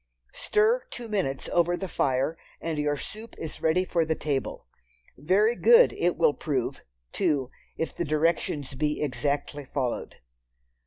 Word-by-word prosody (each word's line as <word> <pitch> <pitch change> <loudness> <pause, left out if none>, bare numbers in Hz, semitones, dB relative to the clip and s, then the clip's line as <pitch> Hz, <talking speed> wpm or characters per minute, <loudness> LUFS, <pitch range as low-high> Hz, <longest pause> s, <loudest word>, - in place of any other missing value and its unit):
Stir 440 +4 +2
two 240 -2 -7
minutes 190 -11 -2
over 175 0 +2
the 190 - -4
fire, 135 -1 0 0.2
and 160 -2 -3
your 145 0 0
soup 220 +9 -8
is 160 - -7
ready 170 +3 +2
for 170 -2 +1
the 160 0 0
table. 140 -4 -3 0.5
Very 200 - +2
good 475 - +6
it - - 0
will 475 -2 +4
prove, 135 -6 -2 0.3
too, 135 -4 0 0.3
if 160 - -3
the - - -1
directions 155 -3 0
be 150 +3 -1
exactly 145 +2 -2
followed. 130 -2 -3
155 Hz, 145 wpm, -27 LUFS, 145-190 Hz, 0.5 s, good